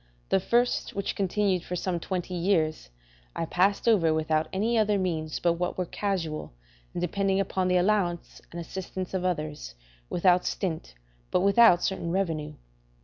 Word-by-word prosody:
The 195 Hz, -, +3 dB
first, 240 Hz, +6 st, +1 dB
which 200 Hz, -1 st, -2 dB
continued 195 Hz, -1 st, +1 dB
for 180 Hz, -, -4 dB
some 180 Hz, 0 st, -2 dB
twenty 180 Hz, +1 st, -4 dB
years, 170 Hz, -, 0 dB, 0.5 s
I -, -, -1 dB
passed 195 Hz, +7 st, +1 dB
over 185 Hz, -8 st, +4 dB
without 155 Hz, 0 st, 0 dB
any 220 Hz, +5 st, 0 dB
other 210 Hz, -2 st, +3 dB
means 160 Hz, -5 st, -2 dB
but 170 Hz, -1 st, +2 dB
what 175 Hz, +1 st, -3 dB
were 185 Hz, -, -1 dB
casual 170 Hz, -, -3 dB, 0.4 s
and -, -, -1 dB
depending 195 Hz, +2 st, 0 dB
upon 190 Hz, -1 st, 0 dB
the 180 Hz, 0 st, +3 dB
allowance 180 Hz, -2 st, 0 dB
and 170 Hz, -, -6 dB
assistance 185 Hz, +2 st, -6 dB
of 185 Hz, -1 st, -1 dB
others, 150 Hz, -, -3 dB, 0.3 s
without 180 Hz, 0 st, +3 dB
stint, 160 Hz, -, -3 dB, 0.3 s
but -, -, +2 dB
without 200 Hz, -2 st, +6 dB
certain 190 Hz, -3 st, -1 dB
revenue. 160 Hz, -5 st, -2 dB
180 Hz, 155 wpm, -27 LUFS, 165-195 Hz, 0.5 s, without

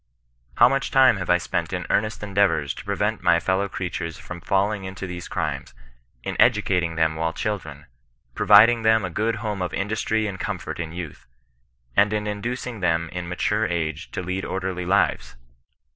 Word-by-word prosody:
How 120 Hz, -, +7 dB
much 135 Hz, +2 st, 0 dB
time 130 Hz, -5 st, +5 dB
have 90 Hz, -2 st, -5 dB
I 90 Hz, -, +5 dB
spent 90 Hz, -, -3 dB
in -, -, -3 dB
earnest 110 Hz, 0 st, 0 dB
endeavours 100 Hz, -8 st, +1 dB
to -, -, -10 dB
prevent -, -, -1 dB
my 85 Hz, -1 st, +4 dB
fellow 95 Hz, +3 st, 0 dB
crea 95 Hz, -2 st, -4 dB
tures 85 Hz, -2 st, -5 dB
from 90 Hz, -1 st, -9 dB
falling 100 Hz, +3 st, 0 dB
into 95 Hz, 0 st, -6 dB
these 90 Hz, -1 st, -6 dB
crimes, -, -, -4 dB, 0.5 s
in -, -, -4 dB
educating 90 Hz, -3 st, +3 dB
them 80 Hz, -1 st, +2 dB
while 80 Hz, +1 st, -1 dB
children, 80 Hz, -8 st, -4 dB, 0.5 s
providing 110 Hz, -, +6 dB
them 110 Hz, -2 st, +3 dB
a 90 Hz, -, -5 dB
good 110 Hz, +6 st, 0 dB
home 105 Hz, -3 st, -2 dB
of 90 Hz, -, -2 dB
industry 110 Hz, +2 st, -1 dB
and 95 Hz, -3 st, -4 dB
comfort -, -, -4 dB
in 80 Hz, -2 st, -4 dB
youth, 85 Hz, -4 st, -8 dB, 0.7 s
and 105 Hz, +1 st, +4 dB
in 105 Hz, 0 st, -1 dB
inducing 115 Hz, +3 st, -4 dB
them 85 Hz, -2 st, 0 dB
in 90 Hz, 0 st, -5 dB
mature 105 Hz, +4 st, 0 dB
age 80 Hz, -2 st, -3 dB
to 95 Hz, -, -3 dB
lead 95 Hz, +2 st, -3 dB
orderly 95 Hz, -2 st, -3 dB
lives 100 Hz, -9 st, +1 dB
95 Hz, 175 wpm, -24 LUFS, 85-105 Hz, 0.7 s, How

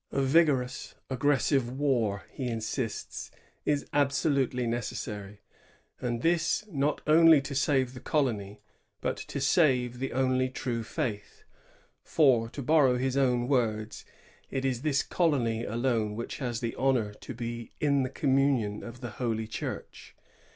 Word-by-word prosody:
A 135 Hz, -, 0 dB
vigorous, 135 Hz, -4 st, +2 dB, 0.2 s
aggressive 135 Hz, -1 st, +2 dB
war, 120 Hz, -9 st, +1 dB
he 130 Hz, -, -4 dB
insists, 115 Hz, 0 st, -4 dB, 0.4 s
is 145 Hz, -1 st, +1 dB
absolutely 140 Hz, -3 st, +1 dB
necessary, 105 Hz, -3 st, -4 dB, 0.6 s
and 120 Hz, -1 st, -3 dB
this 170 Hz, +5 st, +1 dB
not 145 Hz, -1 st, 0 dB
only 160 Hz, 0 st, +7 dB
to 140 Hz, +1 st, -6 dB
save 135 Hz, -2 st, +1 dB
the 125 Hz, -, -8 dB
colony, 110 Hz, -8 st, -1 dB, 0.4 s
but -, -, -1 dB
to -, -, -6 dB
save 125 Hz, -7 st, +2 dB
the 135 Hz, -, -3 dB
only 130 Hz, 0 st, +1 dB
true 125 Hz, -2 st, -3 dB
faith; 110 Hz, -3 st, -4 dB, 0.6 s
"for," 125 Hz, -7 st, +3 dB
to 140 Hz, -, -6 dB
borrow 135 Hz, -3 st, +4 dB
his 130 Hz, +1 st, -1 dB
own 125 Hz, -3 st, +2 dB
words, 110 Hz, -5 st, 0 dB, 0.5 s
"it 135 Hz, 0 st, -2 dB
is 125 Hz, -3 st, 0 dB
this 145 Hz, -2 st, +1 dB
colony 120 Hz, -9 st, 0 dB
alone 115 Hz, -2 st, 0 dB
which 115 Hz, +2 st, -5 dB
has 120 Hz, -4 st, -3 dB
the 115 Hz, -2 st, -2 dB
honor 125 Hz, -6 st, +1 dB
to 125 Hz, -, -9 dB
be 115 Hz, -1 st, -5 dB
in 140 Hz, -2 st, +2 dB
the 130 Hz, -, -1 dB
com 135 Hz, 0 st, +1 dB
munion 130 Hz, -7 st, +1 dB
of 120 Hz, +1 st, -9 dB
the 120 Hz, -3 st, -5 dB
Holy 110 Hz, -2 st, -1 dB
Church. 110 Hz, -1 st, -7 dB
125 Hz, 145 wpm, -29 LUFS, 115-140 Hz, 0.6 s, only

